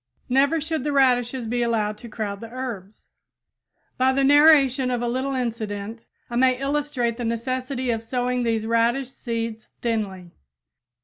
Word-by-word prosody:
Never 275 +5 +3
should 315 -2 -3
the 295 - -1
radishes 255 -2 +2
be 240 +2 -1
allowed 220 -3 0
to 235 - -10
crowd 210 -2 -4
the 230 - -8
herbs. 230 -6 -7 0.9
By 260 +1 +4
the 275 +1 +2
narration 280 -3 +5
of 245 -1 0
a - - 0
little 260 +3 -1
incident, 225 -3 -4 0.2
I 240 - -4
may 255 0 +4
illustrate 275 -4 -1
the 245 - -4
necessity 255 +2 -2
of 225 -1 -2
sowing 250 +2 -1
these 225 -2 0
radish 235 +3 +1
seeds 230 -3 -4 0.2
thinly. 200 -7 -2
245 Hz, 150 wpm, -24 LUFS, 230-265 Hz, 0.9 s, narration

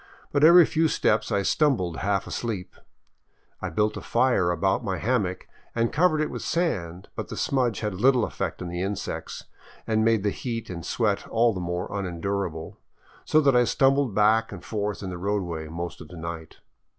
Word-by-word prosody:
But 145 0 +1
every 170 +2 +9
few 160 0 +2
steps 105 -7 +1
I 100 -1 +1
stumbled 100 - +1
half 100 0 0
asleep. 110 -6 -4 0.9
I 95 - -3
built 105 +5 0
a - - -6
fire 120 -7 +2
about 95 +5 +1
my 95 -4 -2
hammock 100 -5 -1 0.3
and 115 0 0
covered 155 0 +3
it 155 - -1
with - - -5
sand, 95 - -2
but - - -4
the - - -7
smudge 125 -6 0
had 105 -3 -2
little 125 +4 +3
effect - - -4
on - - -5
the 85 +1 -4
insects 100 +1 -4 0.4
and 110 -1 +1
made 115 -3 +3
the 105 - +1
heat 115 -3 -5
and 85 -2 -6
sweat 105 +2 0
all 115 0 +2
the 95 - -4
more 90 +1 -3
unendurable, 90 -3 -3 0.5
so 155 - +4
that 140 -3 +4
I 125 - +6
stumbled 135 -3 +2
back 110 +2 +3
and 95 -3 -9
forth 105 -1 -3
in 95 - -4
the 90 - -6
roadway 90 -5 -2
most 85 +2 -6
of 80 - -10
the 85 - -11
night. 80 -1 -7
105 Hz, 185 wpm, -25 LUFS, 90-120 Hz, 0.9 s, every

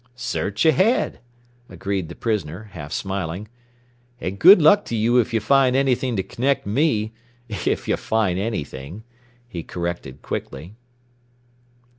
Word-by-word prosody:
"Search 120 -1 -2
ahead," 185 - +3 0.5
agreed 95 -4 -3
the 85 - -8
prisoner, 105 -2 -3
half 75 -4 -8
smiling. 95 0 -3 0.7
"And 100 -4 -4
good 185 +3 +9
luck 185 +7 +6
to 115 - -3
you 115 +3 +3
if 120 +1 0
you 115 - +1
find 130 +3 +3
anything 130 -2 +1
to 95 - -1
connect 135 +5 -1
me 110 -2 +1 0.3
if 105 - -2
you - - +2
find 105 -5 0
anything," 90 -3 -5 0.4
he 90 -8 -6
corrected 85 -6 -5
quickly. 85 +6 -6
110 Hz, 130 wpm, -22 LUFS, 90-125 Hz, 0.7 s, good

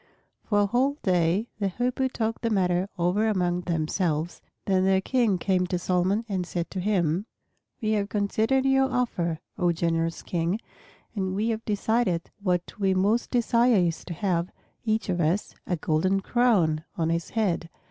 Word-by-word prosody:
For 205 -2 +1
a - - +4
whole 260 +7 +1
day 180 +3 +2
the 200 - +1
Hoopoes 250 +6 -1
talked 225 -2 -2
the 230 - 0
matter 185 -2 +1
over 180 +5 +1
among 180 -4 +1
themselves, 165 -1 -1 0.2
then 190 -1 +2
their 190 0 +4
King 225 -1 +1
came 185 0 +1
to 180 - -1
Solomon 185 +5 0
and 190 -4 -1
said 175 -1 -4
to 190 - -3
him, 185 -1 0 0.6
"We 215 - +1
have 205 -2 0
considered 220 +6 +1
your 270 0 +3
offer, 175 -10 -1 0.2
O 175 -2 +3
generous 165 0 -1
King, 175 +4 -1 0.6
and 190 -2 -1
we 215 +3 0
have 225 0 -2
decided 205 -4 +1
that - - -28
what 180 0 -1
we 190 -2 +2
most 205 +5 +1
desire 240 0 +3
is 175 -4 +1
to 170 - -6
have, 180 -1 0 0.3
each 220 -1 0
of 180 -2 0
us, 170 +6 0
a 180 - +1
golden 175 +5 +1
crown 190 -11 +2
on 165 -1 0
his 170 0 -2
head." 175 -6 0
190 Hz, 170 wpm, -26 LUFS, 175-220 Hz, 0.6 s, a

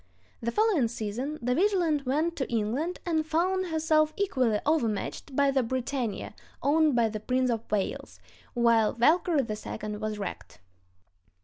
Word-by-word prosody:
The 235 - -1
following 415 - +2
season 235 +6 -4
the 250 +1 +1
Vigilant 335 -5 +1
went 315 +6 +1
to 265 - -2
England, 240 +11 -1
and 320 -3 +1
found 360 +4 0
herself 310 -1 +2
equally 255 - +1
overmatched 260 -2 -1
by 280 0 +3
the 270 -1 +2
Britannia, 245 -3 -3 0.3
owned 300 0 +3
by 235 -2 +3
the 215 -1 -4
Prince 255 +3 0
of 230 -1 -4
Wales, 205 -2 -2 0.4
while 230 -2 +3
Valkyrie 305 +3 +3
II 215 0 -5
was 215 0 -3
wrecked. 200 -2 -7
265 Hz, 140 wpm, -28 LUFS, 225-315 Hz, 0.4 s, by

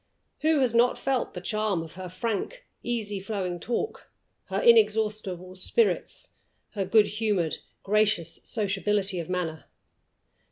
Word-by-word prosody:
Who 310 -2 +3
has 250 -3 +2
not 240 +1 +4
felt 265 -6 -1
the 180 - -5
charm 210 -3 0
of 160 - -11
her 185 0 -7
frank, 230 - -3 0.2
easily 215 -4 -2
flowing 190 -3 -3
talk, 245 - -3 0.4
her - - -2
inexhaustible 215 - +3
spirits, 435 - 0 0.4
her 195 -2 -2
good 210 +2 +5
humored, 205 -7 0 0.3
gracious 205 -5 +1
sociability 200 -2 0
of 165 - -5
manner? 170 -4 -3
210 Hz, 125 wpm, -27 LUFS, 185-230 Hz, 0.4 s, good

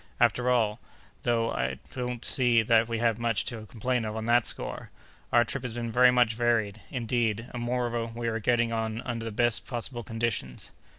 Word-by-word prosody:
"After 120 +1 +3
all, 115 -3 +2 0.4
though, 115 -1 +1
I 65 0 -1
don't 125 -2 -4
see 120 -3 +3
that 115 0 +4
we 115 -1 -2
have 115 -1 +1
much 115 -2 0
to 110 -3 -5
complain 125 +2 -1
of 110 0 -4
on 110 0 -3
that 120 0 +3
score. - - -2 0.4
Our 120 0 +5
trip 135 +4 -3
has 120 -2 -5
been 120 -1 -3
very 125 +2 +6
much 125 -2 +3
varied, 110 -3 0
indeed; 115 -2 -1
and, 120 - -4
moreover, 120 -1 -1
we 115 +1 -5
are 115 0 -1
getting 120 +1 +2
on 110 0 -2
under 115 -2 -4
the 115 - -3
best 120 +1 +1
possible 120 0 -4
conditions." 115 - -3
115 Hz, 190 wpm, -28 LUFS, 110-120 Hz, 0.4 s, very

